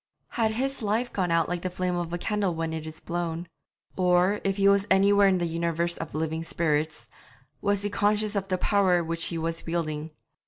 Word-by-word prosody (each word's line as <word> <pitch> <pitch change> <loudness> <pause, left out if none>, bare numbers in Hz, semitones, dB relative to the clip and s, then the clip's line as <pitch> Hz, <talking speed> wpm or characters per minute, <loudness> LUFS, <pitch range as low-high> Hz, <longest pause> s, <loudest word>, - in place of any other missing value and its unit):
Had 220 -2 0
his 270 +3 -2
life 220 +3 -1
gone 185 -3 0
out 165 0 +2
like 175 -1 -2
the 185 - -2
flame 180 0 -2
of 175 -1 -3
a 175 - -1
candle 200 -1 -1
when 165 0 -2
it 160 -1 -5
is 155 0 -8
blown? 170 0 -3 0.5
Or, 180 +2 +3
if 195 0 0
he 200 0 +4
was 200 0 +4
anywhere 200 +1 +5
in 190 -1 +3
the 175 - 0
universe 170 +1 -1
of 165 - -6
living 160 +1 -2
spirits, 155 -2 -1 0.5
was 205 -1 +1
he 205 - -1
conscious 210 +1 +1
of 195 -1 -1
the 185 -1 0
power 185 -3 +3
which 165 0 -1
he 170 - -2
was 165 +1 -2
wielding? 155 -2 -2
175 Hz, 205 wpm, -27 LUFS, 165-200 Hz, 0.5 s, anywhere